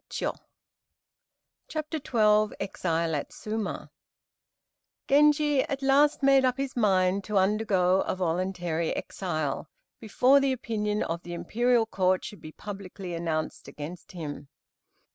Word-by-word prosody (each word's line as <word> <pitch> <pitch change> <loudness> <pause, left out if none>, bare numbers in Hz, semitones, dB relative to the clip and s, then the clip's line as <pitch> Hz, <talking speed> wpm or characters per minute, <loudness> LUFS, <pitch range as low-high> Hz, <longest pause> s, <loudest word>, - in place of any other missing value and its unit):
] - - -64 1.6
CHAPTER 310 0 -3
XII 215 -5 +2
EXILE 165 -3 -1
AT 145 - -4
SUMA 215 -1 -4 1.2
Genji 295 0 +4
at 275 0 -4
last 280 +2 +4
made 275 -1 +5
up 255 0 +2
his 275 -1 -3
mind 195 -4 +2
to 210 -2 -1
undergo 190 -2 +2
a - - -2
voluntary 175 -2 -1
exile, 155 -5 -3 0.3
before 250 +5 +4
the 275 -1 +1
opinion 210 -4 -2
of 165 +1 -3
the 175 - -8
Imperial 240 +5 +2
Court 185 -3 +1
should 205 - -9
be 155 - -9
publicly 195 -1 -8
announced 165 -2 -3
against 165 +5 -9
him. 150 -4 -6
200 Hz, 125 wpm, -27 LUFS, 175-250 Hz, 1.6 s, made